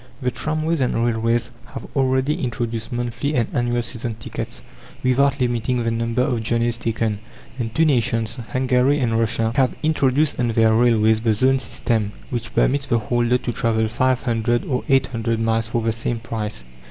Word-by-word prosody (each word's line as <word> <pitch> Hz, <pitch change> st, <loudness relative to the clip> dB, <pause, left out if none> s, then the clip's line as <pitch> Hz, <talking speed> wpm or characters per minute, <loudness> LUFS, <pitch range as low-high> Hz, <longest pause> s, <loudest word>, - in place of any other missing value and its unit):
The 125 Hz, -2 st, -1 dB
tramways 155 Hz, +2 st, -1 dB
and 125 Hz, -, +1 dB
railways 115 Hz, +1 st, 0 dB, 0.2 s
have -, -, -6 dB
already 130 Hz, +2 st, +1 dB
introduced 115 Hz, -2 st, -3 dB
monthly 120 Hz, +4 st, -2 dB
and 120 Hz, -4 st, +1 dB
annual 120 Hz, 0 st, 0 dB
season 120 Hz, -1 st, -3 dB
tickets, 110 Hz, -, -6 dB, 0.4 s
without 140 Hz, +2 st, +2 dB
limiting 120 Hz, 0 st, 0 dB
the 115 Hz, -, 0 dB
number 115 Hz, +2 st, 0 dB
of 125 Hz, -4 st, 0 dB
journeys 115 Hz, +1 st, 0 dB
taken; 110 Hz, -2 st, -1 dB, 0.4 s
and 115 Hz, -2 st, -2 dB
two 160 Hz, -, +4 dB
nations, 115 Hz, -5 st, +1 dB
Hungary 130 Hz, +2 st, +2 dB
and 115 Hz, -3 st, +1 dB
Russia, 115 Hz, 0 st, +1 dB
have 130 Hz, -1 st, +2 dB
introduced 150 Hz, -1 st, +2 dB
on 120 Hz, -, +2 dB
their 115 Hz, -1 st, +3 dB
railways 110 Hz, -2 st, +3 dB
the 115 Hz, -1 st, +2 dB
zone 130 Hz, +4 st, +3 dB
system, 110 Hz, -5 st, -1 dB, 0.2 s
which 115 Hz, -3 st, -4 dB
permits 140 Hz, +1 st, +2 dB
the 120 Hz, -, +2 dB
holder 120 Hz, +2 st, +1 dB
to 120 Hz, -1 st, -4 dB
travel 110 Hz, -1 st, +1 dB
five 130 Hz, +3 st, +1 dB
hundred 120 Hz, -1 st, 0 dB
or 125 Hz, -3 st, -1 dB
eight 135 Hz, -1 st, +4 dB
hundred 115 Hz, -2 st, -2 dB
miles 115 Hz, 0 st, +1 dB
for 115 Hz, 0 st, -1 dB
the 115 Hz, -, +1 dB
same 115 Hz, +1 st, -2 dB
price. 110 Hz, -, -4 dB
120 Hz, 175 wpm, -21 LUFS, 115-130 Hz, 0.4 s, two